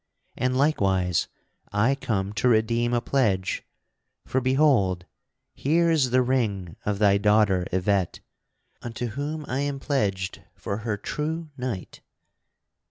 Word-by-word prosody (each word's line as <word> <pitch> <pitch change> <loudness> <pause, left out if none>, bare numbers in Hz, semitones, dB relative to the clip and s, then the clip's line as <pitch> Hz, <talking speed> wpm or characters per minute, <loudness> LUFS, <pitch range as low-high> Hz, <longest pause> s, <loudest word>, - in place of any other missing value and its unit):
And 130 0 0
likewise 95 - +2 0.4
I 105 +6 +3
come 100 -7 -2
to 115 +3 +1
redeem 115 +1 +2
a 120 -1 +1
pledge, 105 -9 0 0.6
for, 130 - 0
behold, 130 - +2 0.5
here 165 +4 +2
is 145 -6 +3
the 130 +1 +3
ring 105 -9 -1
of 105 -1 +1
thy 100 -1 +4
daughter 105 -3 +3
Yvette, 95 0 0 0.6
unto 120 0 -4
whom 145 +6 -4
I 130 - -2
am 140 -1 -2
pledged 100 -10 -1
for 100 - -4
her 110 -1 -2
true 155 +8 -4
knight. 125 -8 -5
115 Hz, 125 wpm, -25 LUFS, 100-135 Hz, 0.6 s, thy